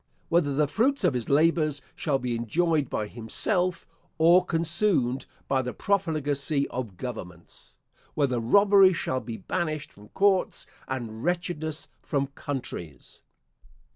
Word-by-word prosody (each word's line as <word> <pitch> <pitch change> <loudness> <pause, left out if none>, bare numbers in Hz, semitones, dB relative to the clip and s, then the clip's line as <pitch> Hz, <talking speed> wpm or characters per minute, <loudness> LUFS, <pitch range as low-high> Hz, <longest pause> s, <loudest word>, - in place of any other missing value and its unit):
Whether 155 -5 +2
the 150 +1 +2
fruits 265 - +1
of - - +3
his 120 -3 -3
labours 155 0 +2 0.2
shall 145 -4 0
be 125 -2 -3
enjoyed 150 +6 0
by 105 - -2
himself 170 - -1 0.3
or 170 +3 +6
consumed 165 -6 +2 0.2
by 135 -1 +1
the 125 -1 -5
profligacy 150 -7 0
of 115 -7 -5
governments? 90 -9 -9 0.4
Whether 135 -5 +1
robbery 195 - +5
shall 130 -5 -1
be 115 -3 -7
banished 155 - -3
from 105 +1 -16
courts, 195 -1 +1 0.2
and 120 -3 -5
wretchedness 175 -3 -2
from 140 -3 -1
countries? 90 - -7
145 Hz, 125 wpm, -26 LUFS, 125-175 Hz, 0.4 s, or